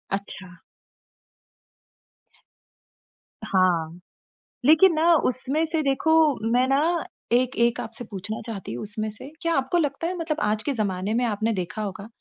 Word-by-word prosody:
अच्छा। 185 -3 -9 2.9
हाँ, 175 -4 +1 0.7
लेकिन 320 +4 +6
ना 335 +2 +4
उसमें 275 +3 0
से 320 0 -1
देखो, 275 +3 +1 0.4
मैं 250 +2 +3
ना 315 +5 +1 0.3
एक 255 +2 +2
एक 235 +1 +2
आपसे 230 +1 -3
पूछना 205 +1 -6
चाहती 200 - -6
हूँ 120 - -5
उसमें 215 +1 -3
से, 210 +6 -11
क्या 335 0 0
आपको 270 +6 0
लगता 300 +1 -1
है 365 - -3
मतलब 320 -2 -2
आज 215 +1 0
के 285 - -1
ज़माने 200 -2 -2
में 245 +2 +1
आपने 220 0 0
देखा 185 +3 -4
होगा 200 0 -5
235 Hz, 145 wpm, -24 LUFS, 205-295 Hz, 2.9 s, लेकिन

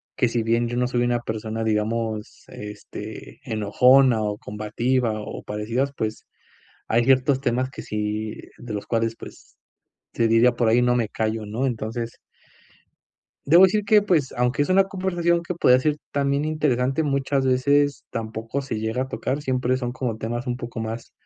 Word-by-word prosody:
que 125 - +2
si 115 -1 -1
bien 115 +1 +1
yo 120 +1 -3
no 125 0 +1
soy 120 -1 0
una 120 0 +1
persona, 110 0 -4
digamos, 110 0 -2
este 105 +1 -9
enojona 120 +2 +4
o 105 -1 -2
combativa, 110 +4 -1
o - - -7
parecidas, 115 +6 -2
pues 110 0 -3 0.6
hay 115 +1 +3
ciertos 130 +1 +3
temas 130 0 0
que - - -8
si 105 0 -3 0.2
de 120 -2 -8
los 105 - -4
cuales, 115 -1 0
pues - - -13 0.6
se 115 - +2
diría 120 +2 +5
por 120 -2 +1
ahí 120 +2 +4
no 125 0 +3
me 115 -3 +1
callo 110 -1 -2
¿no? 115 +6 -2
Entonces 115 -1 -4 1.3
debo 170 +4 +8
decir 205 +2 +4
que, 210 0 +5
pues, 160 -9 +1
aunque 125 +4 +1
es - - -2
una 195 +1 +5
conversación 175 -3 0
que 180 - -2
podría 125 -6 +5
ser 150 +2 0
también 140 +1 0
interesante, 145 -2 0
muchas 140 -1 0
veces 140 +2 +2
tampoco 115 +3 -4
se 135 -4 -5
llega 110 +4 -1
a 130 - -6
tocar, 135 +3 -2
siempre 130 -2 0
son 120 -1 -3
como 125 -4 -3
temas 120 +3 -4
un 120 - -1
poco 120 -2 -6
más 110 +1 -5
120 Hz, 170 wpm, -23 LUFS, 110-135 Hz, 1.3 s, debo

